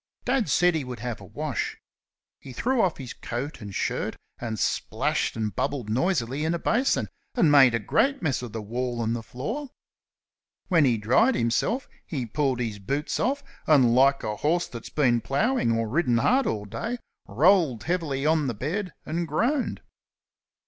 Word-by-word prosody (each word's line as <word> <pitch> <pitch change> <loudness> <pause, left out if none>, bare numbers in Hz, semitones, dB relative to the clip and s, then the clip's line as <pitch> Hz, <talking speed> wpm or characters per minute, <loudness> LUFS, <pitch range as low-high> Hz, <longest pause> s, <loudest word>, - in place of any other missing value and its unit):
Dad 250 - +1
said 175 +6 +4
he 160 -3 -1
would 125 -3 -7
have 120 -2 -4
a - - -10
wash. - - -3 0.6
He 130 - -10
threw 250 - +1
off 180 -6 +1
his 130 -3 -7
coat 130 +4 -5
and 100 -2 -7
shirt - - -1 0.2
and 110 -2 -4
splashed - - 0
and 110 -2 -2
bubbled 125 -7 -2
noisily 135 - 0
in 160 +2 +1
a - - 0
basin, 240 +9 +1 0.3
and 195 - +4
made 135 -5 +7
a - - +1
great 275 - +1
mess 145 -8 -1
of 120 -3 -6
the 110 0 -5
wall 120 +2 -2
and 115 +1 0
the 120 - -4
floor. 225 - -5 1.0
When 165 -6 +5
he 120 -3 +3
dried 130 - +3
himself 195 - 0 0.2
he 135 -7 -4
pulled 130 +2 0
his 110 -4 -3
boots 140 +10 -2
off, 280 +4 0 0.2
and 130 -6 +5
like 135 +2 +4
a 105 -1 -3
horse 170 +7 +1
that 115 -2 -8
had - - -16
been 120 -6 +3
ploughing 180 - +1
or 115 0 0
ridden 125 -1 +2
hard 260 - +3
all 105 -1 -2
day, 230 - -4 0.3
rolled 150 - +3
heavily 155 -6 -1
on 155 -2 +2
the 120 - -2
bed 180 - -3
and 170 +2 -2
groaned. 245 - 0
140 Hz, 180 wpm, -26 LUFS, 120-175 Hz, 1.0 s, made